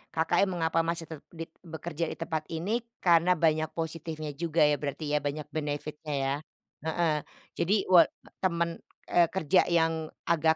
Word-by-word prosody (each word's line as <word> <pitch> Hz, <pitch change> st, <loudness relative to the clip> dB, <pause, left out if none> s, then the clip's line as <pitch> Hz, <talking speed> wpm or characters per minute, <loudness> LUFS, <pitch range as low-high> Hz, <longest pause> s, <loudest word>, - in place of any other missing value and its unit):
Kakaknya 175 Hz, +4 st, +3 dB
mengapa 165 Hz, -2 st, 0 dB
masih 165 Hz, 0 st, 0 dB
tet 155 Hz, -, -6 dB, 0.2 s
dit 165 Hz, 0 st, -7 dB
bekerja 165 Hz, -1 st, -4 dB
di -, -, -5 dB
tempat 160 Hz, -2 st, -3 dB
ini, 185 Hz, +9 st, -1 dB, 0.2 s
karena 175 Hz, 0 st, +5 dB
banyak 155 Hz, -1 st, +2 dB
positifnya 160 Hz, -2 st, -4 dB
juga 165 Hz, +1 st, +1 dB
ya, 150 Hz, -1 st, +3 dB
berarti 150 Hz, +1 st, -3 dB
ya, 150 Hz, -, +3 dB
banyak 145 Hz, +2 st, -3 dB
benefit-nya 150 Hz, 0 st, -4 dB
ya, 135 Hz, +1 st, +1 dB, 0.5 s
heeh. 160 Hz, -1 st, +2 dB, 0.5 s
Jadi 195 Hz, +3 st, +2 dB
wa 175 Hz, -, +9 dB, 0.4 s
temen, 170 Hz, -3 st, 0 dB, 0.3 s
eee, 170 Hz, -1 st, +5 dB
kerja 180 Hz, 0 st, +2 dB
yang 165 Hz, -2 st, +2 dB, 0.2 s
agak 160 Hz, -1 st, +3 dB
160 Hz, 155 wpm, -29 LUFS, 155-170 Hz, 0.5 s, wa